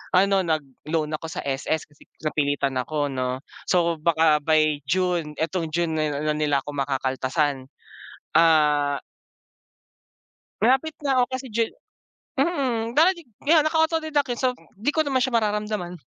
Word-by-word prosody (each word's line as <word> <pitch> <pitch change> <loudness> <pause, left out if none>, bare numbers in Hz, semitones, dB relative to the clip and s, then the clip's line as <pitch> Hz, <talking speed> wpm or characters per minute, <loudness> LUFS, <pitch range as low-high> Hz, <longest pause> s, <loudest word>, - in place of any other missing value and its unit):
ano 195 0 +4
nagloan 155 0 -2
ako 155 +1 -4
sa 160 - -5
SS 140 +3 -1
kasi 145 - -21 0.2
napilitan 145 -3 0
ako 145 +2 -1
'no, 130 0 -3 0.2
so 170 -3 +2
baka 160 -1 +3
by 155 -1 +2
June 175 -3 0
itong 165 +1 -1
June 170 -1 0
na 150 0 0
nila 150 -2 0
ako 145 - -6
makakaltasan. 135 0 -1 0.7
Ah, 150 -3 +4 1.6
malapit 265 +6 +3
na 270 -2 +2
ako 250 - +4
kasi 260 -1 -5
ju 230 +1 +2 0.7
mm, 260 -6 0
dahil 345 +5 +6
di 340 -3 -13 0.2
kaya, 315 +1 +6
naka 310 +2 0
autodeduct 315 -3 0
yan 240 - -7
so, 255 - +3 0.2
di 215 +7 -2
ko 315 -1 +2
naman 265 -2 +1
siya 245 -2 +2
mararamdaman. 210 -4 -2
165 Hz, 140 wpm, -24 LUFS, 150-235 Hz, 1.6 s, dahil